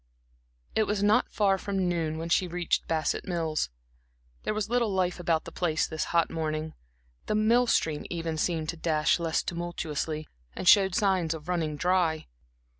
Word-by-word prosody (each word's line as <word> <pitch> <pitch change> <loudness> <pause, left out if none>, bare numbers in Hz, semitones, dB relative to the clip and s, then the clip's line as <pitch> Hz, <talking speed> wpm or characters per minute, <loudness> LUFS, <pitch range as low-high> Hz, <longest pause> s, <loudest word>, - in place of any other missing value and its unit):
It 220 - +2
was 205 -1 0
not 205 +1 +3
far 195 -2 +2
from 195 -2 -1
noon 165 -3 -1
when 165 +1 -4
she 180 +2 +2
reached 175 -1 -1
Bassett 160 -1 -1
Mills. 165 - -1 0.7
There - - -2
was 215 -2 -1
little 235 -1 +1
life 185 -1 0
about 165 -2 0
the 165 - -8
place 160 -2 0
this 160 -1 -3
hot 170 -1 +1
morning; 155 -1 -3 0.5
the 215 - 0
mill 230 +3 +3
stream 155 -9 +1
even 165 -2 -3
seemed 160 0 -1
to 170 - -3
dash 155 0 +2
less 165 -1 0
tumultuously, 160 -3 -3 0.3
and - - -4
showed 190 -1 +6
signs 185 -5 +1
of 155 0 -10
running 165 -4 -1
dry. 175 -1 +1
170 Hz, 170 wpm, -28 LUFS, 160-190 Hz, 0.7 s, showed